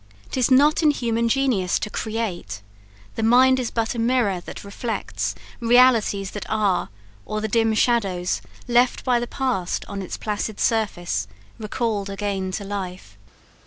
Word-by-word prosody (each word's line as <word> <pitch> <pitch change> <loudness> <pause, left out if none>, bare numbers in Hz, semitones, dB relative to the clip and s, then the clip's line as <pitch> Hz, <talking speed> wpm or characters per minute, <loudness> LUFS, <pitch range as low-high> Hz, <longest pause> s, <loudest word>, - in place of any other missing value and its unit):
'Tis 255 -3 +1
not 290 +5 +5
in 310 - +5
human 235 -4 0
genius 235 -9 +1
to - - -3
create: 210 - -4 0.5
The - - -4
mind 255 +3 +5
is 245 - -1
but 225 -1 -1
a 235 - -4
mirror 230 -6 +1
that - - -8
reflects 215 +3 -3 0.2
Realities 230 -5 +4
that 210 - -7
are, 210 -4 +1 0.3
or 215 - -3
the 220 - -2
dim 225 0 +2
shadows 195 -7 +1 0.3
Left 245 +1 +2
by 250 -2 +3
the 240 - -3
past 245 -10 -1
upon 200 -1 -6
its 185 - -5
placid 210 0 -3
surface 175 - 0 0.3
Recalled 215 -2 -2
again 195 -1 -2
to 200 - -3
life." 185 - -6
220 Hz, 150 wpm, -23 LUFS, 195-240 Hz, 0.5 s, not